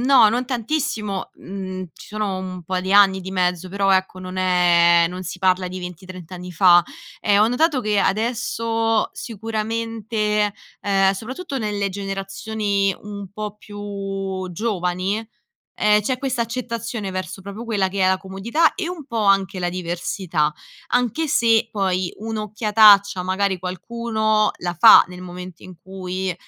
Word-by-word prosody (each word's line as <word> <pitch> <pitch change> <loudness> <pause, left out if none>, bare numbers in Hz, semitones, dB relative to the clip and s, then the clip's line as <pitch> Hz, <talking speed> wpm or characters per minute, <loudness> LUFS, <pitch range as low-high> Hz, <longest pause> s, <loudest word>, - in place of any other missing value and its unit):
no 245 -6 +7
non 245 +2 -1
tantissimo, 230 -6 -2
mhmm 185 -1 -7
ci - - -14
sono 210 -3 -3
un 185 -1 -6
po' 185 +2 -2
di 190 - -4
anni 195 -1 +6
di 190 +1 -7
mezzo 180 -1 0
però 195 +1 0
ecco 190 -1 +1
non 185 0 -6
è 175 -2 +4
non 185 +1 -6
si 180 +1 -6
parla 185 -1 +2
di 185 - -6
20 180 0 -8
trent'anni 180 0 -9
fa, 175 0 +6 0.4
ehm, 205 0 +4
ho 220 - +4
notato 270 +1 +1
che 210 -1 +1
adesso 225 +1 0
sicuramente 220 -1 -2 0.3
ehm 195 -1 +3
soprattutto 265 - -5
nelle 205 -3 -2
generazioni 195 +1 -2
un 200 -1 -8
po' 210 0 -6
più 195 -2 -5
giovani, 185 -1 -1 0.6
ehm, 210 0 +3
c'è 255 +5 -1
questa 260 -2 -2
accettazione 230 -3 -4
verso 185 0 -5
proprio 200 +4 -7
quella 200 -4 +1
che 195 +1 -2
è 185 - +4
la 190 - +3
comodità 205 - +1
e 375 -4 -3
un 350 -5 -6
po' 230 -4 -2
anche 195 -1 +2
la 175 -1 -1
diversità 175 -3 -2 0.4
anche 245 +6 0
se, 230 -4 +3
poi 185 -3 0
un'occhiataccia 210 -2 +4
magari 190 +1 0
qualcuno 215 +3 0
la 175 0 -3
fa - - +9
nel 180 0 -10
momento 180 -1 -9
in 185 - -11
cui 185 0 -4
195 Hz, 150 wpm, -21 LUFS, 185-220 Hz, 0.6 s, fa